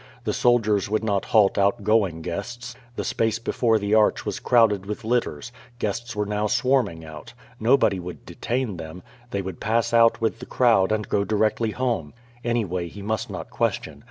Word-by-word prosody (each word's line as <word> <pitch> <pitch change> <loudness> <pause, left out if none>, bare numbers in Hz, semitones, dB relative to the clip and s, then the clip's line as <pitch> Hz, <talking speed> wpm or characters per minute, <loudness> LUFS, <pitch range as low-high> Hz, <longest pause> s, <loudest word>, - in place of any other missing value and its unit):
The - - -1
soldiers 110 -5 +2
would 110 +1 0
not 100 -3 0
halt 105 -2 +3
outgoing 100 -3 +1
guests. 120 +8 -5 0.2
The - - -3
space 115 -1 0
before 115 -1 +1
the 100 0 -1
arch 110 -1 +3
was - - -3
crowded 105 -5 +3
with 105 +2 -5
litters. 120 -5 -1 0.3
Guests 115 +1 -3
were 105 0 -1
now 105 +1 -1
swarming 120 -10 +1
out. 80 +10 -11 0.2
Nobody 110 -4 +3
would 90 0 -8
detain 120 -5 -3
them. 80 +2 -8 0.3
They 100 -4 -2
would 95 -3 -6
pass 115 +2 0
out 115 0 +5
with 115 0 -1
the 125 - -9
crowd 115 -6 +3
and 110 -1 -1
go 100 - +1
directly 110 +2 +1
home. 115 - -2 0.3
Anyway, 100 -7 -1
he 100 +3 -10
must 110 +1 -2
not - - -7
question. - - -2
110 Hz, 175 wpm, -24 LUFS, 100-115 Hz, 0.3 s, out